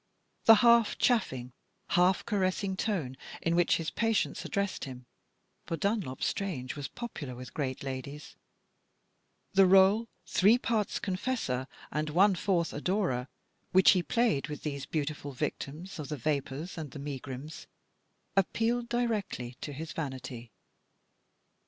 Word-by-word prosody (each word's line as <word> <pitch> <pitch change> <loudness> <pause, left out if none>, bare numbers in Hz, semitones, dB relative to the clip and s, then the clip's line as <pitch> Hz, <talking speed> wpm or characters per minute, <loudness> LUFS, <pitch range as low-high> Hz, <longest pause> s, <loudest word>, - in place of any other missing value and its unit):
The 225 - +10
half 235 -2 +5
chaffing, 130 - +1 0.4
half 180 +1 +3
caressing 190 -2 0
tone 180 - -1 0.2
in 165 0 0
which 175 0 +4
his 165 -2 -3
patients 225 -2 0
addressed 200 -1 -2
him 125 -2 -9 0.6
(for 165 - -2
Dunlop 200 - -1
Strange 145 -11 -2
was 145 -1 -4
popular 160 - -6
with 125 -1 -9
great 135 -3 -3
ladies); 140 +2 -6 1.2
the 195 - +6
r61e, 195 +4 +6 0.2
three 210 +5 +5
parts 225 -4 0
confessor 185 - -2 0.2
and 150 +1 -1
one 190 +6 +5
fourth 175 -2 0
adorer, 150 -6 0 0.5
which 190 0 +8
he 185 - +3
played 230 - +1
with 150 -1 -7
these 140 -3 -4
beautiful 145 -2 -3
victims 155 +6 -4
of 145 -2 -5
the 150 - -3
vapours 145 +5 -2
and 155 -3 -5
the 145 - -9
megrims, 140 +1 -6 0.7
appealed 230 +5 +1
directly 215 - -1
to 145 - -4
his 155 +3 -6
vanity. 130 -6 -6
165 Hz, 130 wpm, -30 LUFS, 140-200 Hz, 1.2 s, The